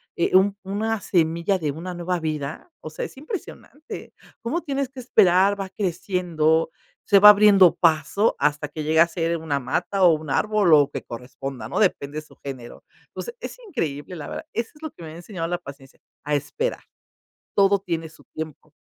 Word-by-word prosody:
eh, 170 - +1
un 200 +1 +4
una 215 +3 -2
semilla 170 +2 +1
de 150 -3 -1
una 175 +5 -6
nueva 175 +1 -2
vida, 155 - -4
o - - -7
sea, - - -6
es - - -11
impresionante, 315 - -8 0.3
cómo 300 +10 -2
tienes 275 -3 -2
que 265 -1 -11
esperar, 200 -3 +4
va 195 - -4
creciendo, 175 -4 0 0.3
se 200 -2 +5
va 210 +1 +10
abriendo 200 -3 +7
paso 165 +5 +2
hasta 150 0 0
que 155 +1 -6
llega 160 +2 +5
a - - -2
ser 165 0 -1
una 150 -3 -2
mata 180 +8 -1
o 170 -2 +7
un 155 -2 -4
árbol 210 -6 +3
o 150 - +8
lo 140 - -7
que - - -5
corresponda, 125 +2 -7
¿no?, - - -2
depende 155 -7 0
su 150 - -19
género, 130 -4 -9 0.3
entonces, 475 0 -7
es - - -7
increíble 165 - -4
la 150 - -7
verdad, 315 - -6
eso 230 0 -3
es 300 - -19
lo 315 - -5
que - - -13
me 160 - -7
ha 160 - -10
enseñado 175 -2 -5
la 175 0 -1
paciencia, 140 -4 -13 0.2
a 150 +1 -2
esperar, 455 - -3 0.7
todo 200 0 +4
tiene 165 -4 -4
su 155 - -19
tiempo. 155 -2 -7
175 Hz, 190 wpm, -23 LUFS, 155-205 Hz, 0.7 s, va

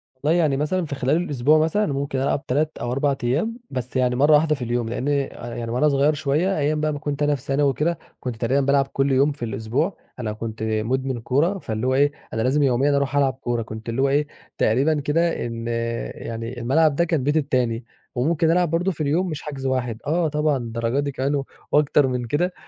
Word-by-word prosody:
والله، 150 +6 +1
يعني 150 -5 +2
مثلًا 165 +5 0
في 145 -2 -4
خلال 135 +2 +1
الأسبوع 150 -3 +2
مثلًا، 165 +7 +2
ممكن 140 -1 -2
ألعب 140 +1 0
3 150 +4 0
أو 120 - -2
4 140 +2 +1
أيام، 160 - 0
بس 125 -1 -5
يعني 125 -1 +2
مرة 145 +4 +4
واحدة 150 +1 +4
في 140 - -11
اليوم، 120 -1 -1
لأن 125 +3 -3 0.5
يعني 115 -1 -4
وأنا 130 +6 +3
صغير 140 +2 +3
شوية، 155 +6 0
أيام 150 +1 0
بقى 155 0 0
ما 145 - -5
كنت 145 -1 -2
أنا 145 0 +3
في 135 - -9
ثانوي 140 +1 +1
وكده، 155 +6 0 0.2
كنت 125 -2 -4
تقريبًا 125 +5 +1
بالعب 140 0 +3
كل 135 0 0
يوم 135 +3 +4
في 140 -4 -5
الأسبوع. 115 - -2 0.2
أنا 110 -3 -2
كنت 110 0 -6
مدمن 120 +4 -1
كورة، 150 - +1
فاللي 110 -4 -3
هو 130 - +2
إيه 145 +2 +4 0.2
أنا 110 - -1
لازم 135 +5 +2
يوميًا 135 +2 +3
أروح 140 -1 -1
ألعب 140 -2 +3
كورة، 120 -3 -2
كنت 110 +1 -7
اللي 115 +3 -1
هو 140 - +3
إيه 145 +2 +2 0.3
تقريبًا 140 +7 +2
كده 165 +3 0
إن 115 -1 -5 0.5
يعني 115 +2 -6
الملعب 140 +5 +3
ده 170 - +3
كان 165 -5 0
بيتي 145 +3 +2
التاني، 125 -5 -1 0.3
وممكن 160 +5 +2
ألعب 175 0 +2
برضه 170 +4 +1
في 160 - -7
اليوم 165 +6 +1
مش 155 -3 -5
حجز 140 -3 -6
1، 125 -4 -1
آه، 165 +2 +2
طبعًا 150 -2 +1
للدرجة 115 +2 -2
دي 145 0 -1
كمان 135 +2 -1
و 140 -1 -2 0.3
وأكتر 145 -1 +4
من 125 -1 -2
كده. 160 +9 0
140 Hz, 215 wpm, -23 LUFS, 125-150 Hz, 0.5 s, مرة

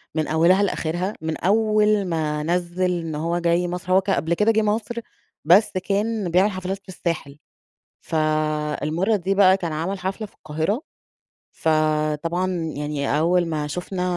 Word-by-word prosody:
من 155 -1 0
أولها 170 +5 +4
لآخرها، 180 +1 -1
من 160 0 -3
أوّل 215 0 +2
ما 155 -3 -1
نزِّل 175 +2 0
إن 165 -2 -5
هو 170 +3 -1
جاي 170 +1 +1
مصر. 180 +1 -4
هو 190 - +5
ك 190 - -6
قبل 170 -3 +1
كده 210 +6 +3
جه 220 0 +2
مصر 215 +2 -1 0.5
بس 185 +7 +5
كان 205 +1 -1
بيعمل 190 +4 +4
حفلات 185 0 -4
في - - -19
الساحل، 165 -6 -4 0.6
فالمرّة 155 +4 0
دي 195 0 -1
بقى 190 -1 +6
كان 170 -4 -4
عمل 170 +6 -2
حفلة 190 +4 -4
في - - -25
القاهرة، 160 - -2 0.7
فطبعًا 155 +3 0 0.2
يعني 145 0 -1
أوّل 175 +2 +3
ما 155 -2 -2
شُفنا 180 +4 -4
175 Hz, 150 wpm, -23 LUFS, 155-195 Hz, 0.7 s, بقى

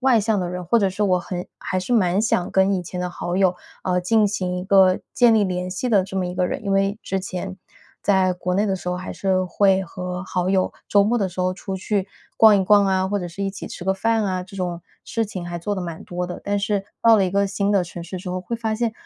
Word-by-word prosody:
外 255 -4 +4
向 215 -1 +1
的 180 -1 -2
人， 180 0 -5
或 230 +7 +3
者 195 -2 +2
是 195 +3 -3
我 185 -3 +3
很 180 0 -5
还 185 - -2
是 185 - -3
蛮 190 -3 +3
想 185 -5 +1
跟 190 +1 +3
以 185 - -1
前 180 +1 -6
的 180 0 -2
好 175 0 -4
友， 185 -2 +3 0.3
呃， 180 -1 +1
进 215 +4 +3
行 185 -3 -2
一 180 - -3
个 190 -1 +5
建 240 -2 +5
立 215 - +4
联 180 -1 -2
系 190 +7 -3
的 200 -5 +3
这 190 0 -7
么 185 - 0
一 180 - -5
个 180 0 +1
人。 - - -4
因 200 - -2
为 195 +1 +2
之 195 - -2
前， 185 0 -5 0.5
在 190 -2 +3
国 180 0 -3
内 200 +3 +2
的 195 - 0
时 180 - -6
候 180 - -1
还 180 - -6
是 190 -1 0
会 190 +1 +2
和 180 0 -5
好 185 -1 -2
友 190 -1 +1 0.2
周 200 -1 +5
末 235 +4 +1
的 195 -3 0
时 185 +1 -6
候 185 0 +1
出 190 +1 -6
去 195 0 -1 0.3
逛 215 -2 +7
一 190 - +2
逛 205 0 +5
啊， 190 0 +1
或 205 +1 0
者 180 - -4
是 180 +3 -6
一 195 - -1
起 195 - -8
吃 - - -8
个 190 +1 +1
饭 225 +2 +1
啊， 185 -2 -1
这 195 +1 -12
种 175 -2 -3 0.2
事 225 -1 -1
情 185 -4 -6
还 175 - -4
做 205 +5 -2
得 190 - -4
蛮 170 -2 -6
多 180 0 -4
的。 180 - -6
但 205 0 0
是 200 0 -1 0.2
到 230 -1 +7
了 195 - +3
一 180 - -1
个 200 +1 +2
新 200 +1 0
的 195 -2 +3
城 170 0 -8
市 185 +2 -6
之 180 +1 -7
后， 185 - -3
会 235 - -4
发 225 -1 -2
现 230 0 0
190 Hz, 300 characters per minute, -22 LUFS, 180-205 Hz, 0.5 s, 逛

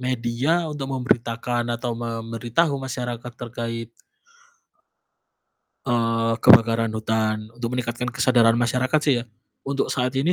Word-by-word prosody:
media 130 +7 0
untuk 145 -3 -5
memberitakan 120 -2 -1
atau 120 0 -3
memberitahu 115 +6 -1
masyarakat 120 -2 -5
terkait 115 -1 -5 1.9
eee, 115 -2 +1
kebakaran 115 0 +6
hutan 110 0 -1
untuk 120 +1 -4
meningkatkan 120 0 -3
kesadaran 120 -3 +3
masyarakat 125 +4 +1
sih 145 - +4
ya, - - -8 0.4
untuk 140 0 -1
saat 125 +1 -1
ini 150 +7 +2
120 Hz, 110 wpm, -23 LUFS, 115-130 Hz, 1.9 s, kebakaran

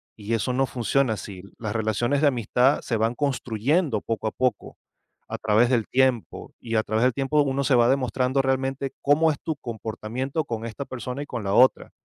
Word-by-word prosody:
Y 105 +1 -4
eso 115 +3 0
no 135 +2 +1
funciona 125 0 0
así. 95 -2 -8 0.2
Las 110 -2 -4
relaciones 115 +5 0
de 150 - +5
amistad, 125 +1 +2
se 115 - -2
van 115 +2 +1
construyendo 130 - 0
poco 115 -1 -4
a 110 - -1
poco, 125 -4 -2 0.5
a - - -4
través 110 +3 +3
del 120 -4 +1
tiempo. 130 -3 0
Y 115 -1 -4
a 110 - +4
través 110 +2 0
del 125 0 +3
tiempo, 140 +3 +1
uno 140 0 -1
se 135 -1 +3
va 120 -1 +5
demostrando 130 0 +1
realmente, 135 +1 -1
cómo 155 +3 +4
es 145 - -4
tu 160 - -2
comportamiento 120 +4 -4
con 115 -4 -5
esta 115 +4 -6
persona, 125 +1 -6
y 145 - -6
con 120 -5 -5
la 100 - -1
otra. 130 +4 +4
125 Hz, 200 wpm, -24 LUFS, 110-135 Hz, 0.5 s, de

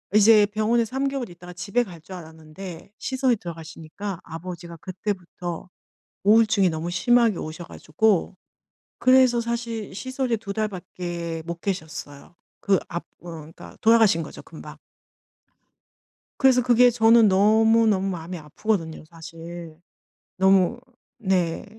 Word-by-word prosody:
이제 215 0 +7
병원에 215 +3 +1
3 265 +5 -2
개월 270 -5 -4
있다가 175 0 -12
집에 200 +7 -1
갈 180 -7 -11
줄 185 +4 -10
알았는데 160 +2 -10
시설에 260 -2 +1
들어가시니까 165 +1 -8
아버지가 170 0 -8
그때부터 180 -2 -5 0.5
우울증이 215 -2 +4
너무 160 +1 -4
심하게 230 +2 +3
오셔 155 +2 -6
가지고 185 +4 0 0.6
그래서 255 -2 +5
사실 230 -3 -4
시설에 260 +1 -2
2 200 -2 -6
달밖에 175 -5 -4
못 170 0 -6
계셨어요. 160 -5 -6 0.2
그 195 -2 +2
압 170 - -4 0.2
어 175 - -9
그러니까 160 0 -11
돌아가신 220 -7 +4
거죠, - - -10
금방. - - -12 1.6
그래서 260 -2 +5
그게 245 0 +5
저는 225 -1 +5
너무너무 215 0 +4
마음이 175 0 -5
아프거든요, 160 +1 -3
사실. 165 0 -10 0.6
너무 190 +4 +3 0.4
네. 185 -7 0
190 Hz, 285 characters per minute, -24 LUFS, 170-225 Hz, 1.6 s, 이제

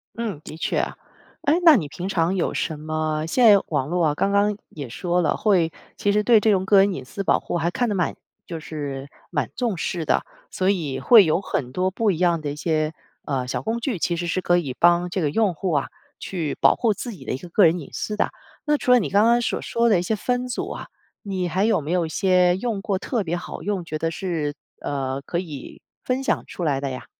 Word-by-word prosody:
嗯， 215 -10 -4
的 155 - -9
确。 - - 0 0.6
诶。 310 +4 +3
那 325 -3 +9
你 160 -8 -2
平 175 +6 -6
常 175 0 +1
有 185 - 0
什 155 -2 -2
么 155 0 -2
现 245 +9 +3
在 200 -2 +7
网 140 -4 0
络 170 0 +1
啊， 150 - 0
刚 195 - +1
刚 200 0 +2
也 140 -5 -8
说 175 +8 0
了 165 - +1
会 180 -6 +2 0.2
其 205 - +1
实 210 +1 +2
对 230 0 +6
这 215 +1 +3
种 190 -2 +1
个 200 0 +6
人 195 0 +4
隐 135 -6 -6
私 195 +9 -5
保 - - +3
护 - - -3
还 170 +1 0
看 245 +6 0
得 210 - -1
蛮 180 -3 0 0.3
就 165 -2 -6
是 145 -3 -6 0.2
蛮 145 -8 -1
重 235 -7 -1
视 170 0 -2
的。 - - +1 0.3
所 185 - 0
以 155 -9 -1
会 220 - +8
有 160 0 +2
很 130 -9 -3
多 185 +7 0
不 215 +2 +1
一 175 - -2
样 170 -2 +2
的 145 -1 -3
一 - - -5
些， 155 0 0 0.3
呃 130 -3 -2
小 - - -2
工 225 +2 -2
具， 235 -5 -2
其 170 +1 0
实 175 +1 -3
是 185 +2 -1
可 175 -1 +3
以 145 -7 -2
帮 175 +1 +4
这 180 +1 -2
个 150 - +1
用 205 +4 +1
户 180 +3 -3
啊， 145 -3 +1 0.3
去 165 -6 -3
保 - - +5
护 230 -3 +1
自 240 +5 -6
己 190 - -12
的 - - -4
一 130 - -1
个 180 - -10
个 185 +4 +3
人 165 +2 +3
隐 145 - -9
私 210 - -3
的。 - - +1 0.3
那 300 -1 +2
除 250 - 0
了 250 - +7
你 205 - -2
刚 200 +2 +4
刚 235 +1 +4
所 - - -1
说 235 0 +1
的 210 -5 +4
一 - - +1
些 180 +5 -1
分 250 +3 -1
组 250 - -3
啊， - - -7 0.3
你 190 -4 -2
还 185 +3 0
有 220 -3 +3
没 150 0 -7
有 180 -2 +2
一 - - -6
些 180 0 +3
用 215 -1 -2
过 195 -2 -1
特 230 -1 -2
别 175 0 -2
好 175 - -7
用， 195 -4 -2
觉 155 -1 -4
得 165 +1 -1
是， 160 -5 -3 0.3
呃 135 -1 -3
可 170 +4 -3
以 150 -7 -8 0.2
分 255 +1 -1
享 270 - 0
出 175 - -5
来 140 -3 +1
的 140 - -2
呀？ 130 - -6
180 Hz, 270 characters per minute, -23 LUFS, 155-205 Hz, 0.6 s, 那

